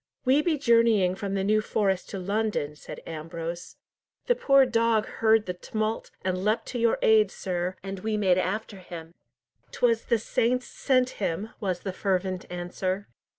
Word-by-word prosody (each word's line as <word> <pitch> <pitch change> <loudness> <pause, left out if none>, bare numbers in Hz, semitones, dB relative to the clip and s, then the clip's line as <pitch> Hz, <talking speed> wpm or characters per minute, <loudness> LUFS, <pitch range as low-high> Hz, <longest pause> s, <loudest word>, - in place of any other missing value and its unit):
"We 265 +4 +5
be 315 -1 +1
journeying 230 -8 +4
from 195 +1 -4
the 195 - 0
New 215 +2 +3
Forest 195 -3 0
to 195 - -5
London," 200 -6 -1
said - - -10
Ambrose. 165 +2 -6 0.5
"The - - +4
poor 275 - +5
dog 230 -3 +2
heard 220 -1 +2
the 180 - -3
tumult, 215 +4 -3 0.2
and 185 0 -1
leapt 215 +2 +1
to 245 - -3
your 230 0 +3
aid, 215 -2 +5
sir, 180 -1 -3
and 195 0 -5
we 215 +2 -1
made 185 -3 +3
after 205 +2 -2
him." 170 -3 -9 0.6
"'Twas 230 -2 +1
the 235 - +2
saints 240 +3 0
sent 255 -2 +1
him!" 195 +4 -2
was 185 -4 -2
the 190 - -4
fervent 185 -1 -1
answer. 185 +2 -3
205 Hz, 165 wpm, -27 LUFS, 185-230 Hz, 0.6 s, We